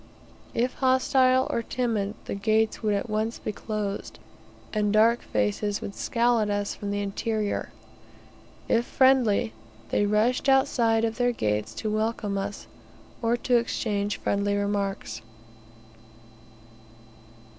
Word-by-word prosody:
If 245 +2 +1
hostile, 260 0 +3
or 235 - 0
timid, 225 -4 -2
the - - -4
gates 215 +2 +1
would 210 -2 +1
at 200 - -2
once 220 +1 -1
be - - -4
closed, 210 -1 -4 0.6
and 210 -1 +1
dark 225 +3 +4
faces 105 - -1
would 200 - -6
scowl 235 +1 +1
at 210 -1 0
us 205 0 -1
from 205 - -6
the 205 0 -1
interior; 210 +1 -2 1.0
if 235 - +3
friendly, 245 - +3 0.4
they 205 - +2
rushed 225 +6 +2
outside 230 -4 +3
of 225 0 -3
their 245 0 +3
gates 105 - -2
to 215 - -3
welcome 215 -2 -1
us, 200 +1 -4 0.6
or 235 +1 +2
to 245 0 +2
exchange 210 -3 -1
friendly 200 0 0
remarks. 200 - -2
215 Hz, 125 wpm, -26 LUFS, 205-235 Hz, 1.0 s, dark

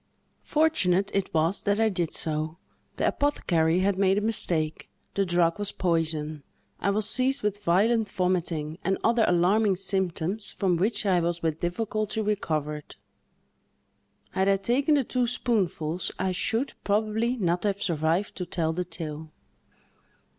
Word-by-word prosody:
Fortunate 200 - +2
it 195 -1 -1
was 165 +4 +2
that 205 +1 0
I 225 - +4
did 175 -5 -2
so; 155 +1 -2 0.4
the - - +1
apothecary 175 - +1
had 195 0 +1
made 195 0 +3
a - - +1
mistake; 160 -8 0 0.2
the 195 -1 0
drug 175 0 +2
was 205 -1 -1
poison; 160 -4 -1 0.4
I 200 - 0
was 205 +1 +2
seized 255 +4 +2
with 205 -1 -1
a - - -27
violent 210 +5 +2
vomiting, 175 -4 -1
and 190 0 +1
other 230 0 +3
alarming 190 +4 +3
symptoms, 190 +1 -1
from 185 -3 0
which 210 +4 0
I 185 -3 +3
was 170 0 -2
with 160 -1 -1
difficulty 215 +4 -2
recovered. 155 -8 -2 1.4
Had 190 +1 +1
I 195 - +4
taken 260 +9 +2
the 280 - +2
two 250 0 0
spoonfuls, 185 -9 -1
I 190 0 0
should, 225 +8 -1
probably, 220 +4 0
not 175 -4 0
have 200 -1 0
survived 170 +1 0
to 180 - -3
tell 160 -2 -1
the 180 +2 -2
tale." 155 -2 -7
190 Hz, 150 wpm, -26 LUFS, 165-215 Hz, 1.4 s, I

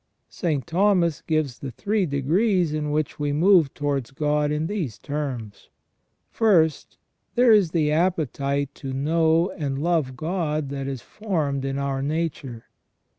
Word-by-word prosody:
St. 150 -6 -2
Thomas 175 -3 +2
gives 155 -6 -1
the 135 - -5
three 200 - -1
degrees 165 - +1
in 150 -1 -2
which 150 0 -2
we 145 -1 0
move 165 -1 +4
towards 140 -4 -2
God 150 +1 0
in 150 +1 -1
these 165 - -3
terms: 135 -8 -5 0.3
" - - -48 0.3
First, 170 -9 +2 0.4
there 245 -1 +5
is 205 -6 +5
the 155 -2 +1
appetite 145 -4 0
to 135 -2 -6
know 160 +5 +2
and 140 -3 -3
love 150 -4 0
God 155 -4 -2
that 135 -1 -4
is 135 -3 -5
formed 155 -10 -2
in 135 0 -2
our 140 -1 -2
nature. 145 -5 -3
150 Hz, 145 wpm, -24 LUFS, 140-170 Hz, 0.4 s, there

